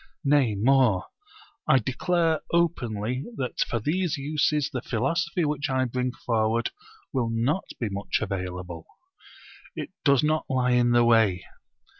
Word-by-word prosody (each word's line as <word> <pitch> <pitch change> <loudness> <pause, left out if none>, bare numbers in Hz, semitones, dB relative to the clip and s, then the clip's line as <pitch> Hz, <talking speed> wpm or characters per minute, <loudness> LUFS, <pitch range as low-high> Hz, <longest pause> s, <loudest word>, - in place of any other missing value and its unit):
Nay 140 -6 +3
more, 120 -3 +3 0.6
I 135 - +6
declare 160 - 0
openly 125 -8 0
that 130 -2 -4
for 115 - 0
these 160 - -1
uses 150 0 0
the 125 - -3
philosophy 170 - -1
which 145 0 -1
I 130 -1 +1
bring 125 +1 -2
forward 115 -1 0 0.4
will 125 -4 0
not 120 +11 0
be 120 - -1
much 100 +1 -2
available. 90 -4 -5 0.9
It - - -6
does 140 -2 +4
not 155 +1 0
lie 130 -1 +1
in 120 -1 +3
the 120 0 +4
way. 110 -6 +3
125 Hz, 135 wpm, -26 LUFS, 115-150 Hz, 0.9 s, I